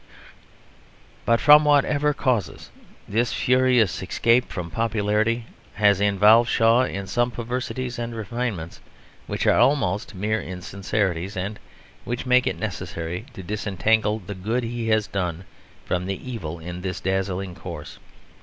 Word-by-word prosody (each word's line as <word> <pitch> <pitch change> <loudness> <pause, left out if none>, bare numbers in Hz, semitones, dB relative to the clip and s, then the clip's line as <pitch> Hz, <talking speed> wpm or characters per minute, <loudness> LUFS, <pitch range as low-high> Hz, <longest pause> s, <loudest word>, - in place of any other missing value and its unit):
But 115 0 +4
from 150 0 +8
whatever 145 0 +3
causes, 130 -7 -2 0.4
this 115 +3 0
furious 120 - +2
escape 115 +6 +2
from 85 -2 -5
popularity 110 +1 0 0.3
has 100 -2 +3
involved 105 +4 +5
Shaw 115 +3 +4
in 100 -4 -5
some 120 +5 0
perversities 125 +1 -4
and 120 0 -4
refinements 110 -5 -4 0.5
which - - -2
are - - +4
almost 105 -8 +1
mere 110 +3 -1
insincerities, 95 0 -3
and 100 +4 -4 0.4
which 120 +2 -4
make 125 0 +4
it - - -1
necessary 85 +7 -5
to 95 - -9
disentangle 105 +2 0
the 100 -1 -8
good 110 +7 -2
he 115 0 -3
has 110 -1 +3
done 90 -3 -3 0.4
from 90 +1 -2
the 95 -1 -2
evil 85 -8 -5
in 90 +2 -7
this 90 -1 -4
dazzling 95 -1 -2
course. 85 -4 -9
105 Hz, 135 wpm, -24 LUFS, 95-120 Hz, 0.5 s, from